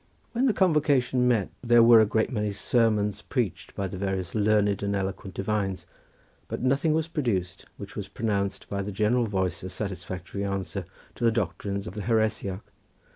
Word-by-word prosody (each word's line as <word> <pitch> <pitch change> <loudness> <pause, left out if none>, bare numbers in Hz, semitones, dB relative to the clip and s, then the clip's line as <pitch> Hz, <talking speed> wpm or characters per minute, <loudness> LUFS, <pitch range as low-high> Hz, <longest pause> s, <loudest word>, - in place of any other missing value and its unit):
When 250 +3 +2
the 235 - +3
convocation 145 -8 +3
met 115 -6 +2
there 120 -1 +6
were 115 -1 +8
a 110 - +3
great 110 +1 +1
many 105 -4 -1
sermons 105 -2 +1
preached 120 - -3
by 100 - -2
various 95 -1 -3
learned 105 -2 +2
and 100 0 -1
eloquent 95 0 -4
divines, 95 -1 -2 0.6
but - - -4
nothing 140 +5 +2
was 160 0 0
produced 110 - -2
which - - -9
was - - -4
pronounced 100 -3 -2
by 100 0 -2
the 100 +1 -4
general 110 +4 +2
voice 95 -4 -1
a 95 - -6
satisfactory 95 -1 -5
answer 95 -2 -3 0.3
to - - -7
the 115 - +6
doctrines 100 -2 -2
of 85 - -7
the 105 - -5
heresiarch. 110 -3 0
105 Hz, 170 wpm, -27 LUFS, 95-120 Hz, 0.6 s, were